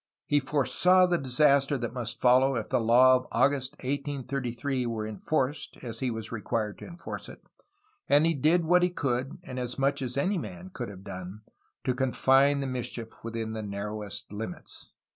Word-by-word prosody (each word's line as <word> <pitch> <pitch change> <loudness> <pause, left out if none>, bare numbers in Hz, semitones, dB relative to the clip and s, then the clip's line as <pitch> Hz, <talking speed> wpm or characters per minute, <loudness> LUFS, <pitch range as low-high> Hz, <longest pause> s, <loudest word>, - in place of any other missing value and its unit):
He 145 - +3
foresaw 155 +7 +3
the 175 -1 +1
disaster 140 +1 +3
that 120 -2 -4
must 120 -3 -2
follow 130 +2 +4
if 110 -3 -3
the 130 - +2
law 125 +3 +6
of 130 - -8
August, 135 +2 +1
1833, 135 -2 -2
were 110 -2 -3
enforced 135 +6 -2
as 115 -2 -6
he 130 - 0
was 110 -1 -5
required 110 -1 -3
to - - -9
enforce 170 -1 -7
it, - - -13 0.7
and 145 +2 +5
he 165 - +3
did 160 +4 +2
what 180 +2 +4
he 180 - +3
could 135 -5 -2
and 130 -7 -6
as 125 -1 -4
much 140 +1 +1
as 125 0 -4
any 185 +7 +1
man 185 +2 -8
could 120 - -5
have 95 -2 -11
done, 95 +1 -8 0.4
to 130 - +1
confine 135 +2 +3
the - - -2
mischief 125 -3 -4
within 115 -1 -4
the 110 - -4
narrowest 105 0 -5
limits." 105 -3 -8
130 Hz, 180 wpm, -28 LUFS, 115-145 Hz, 0.7 s, law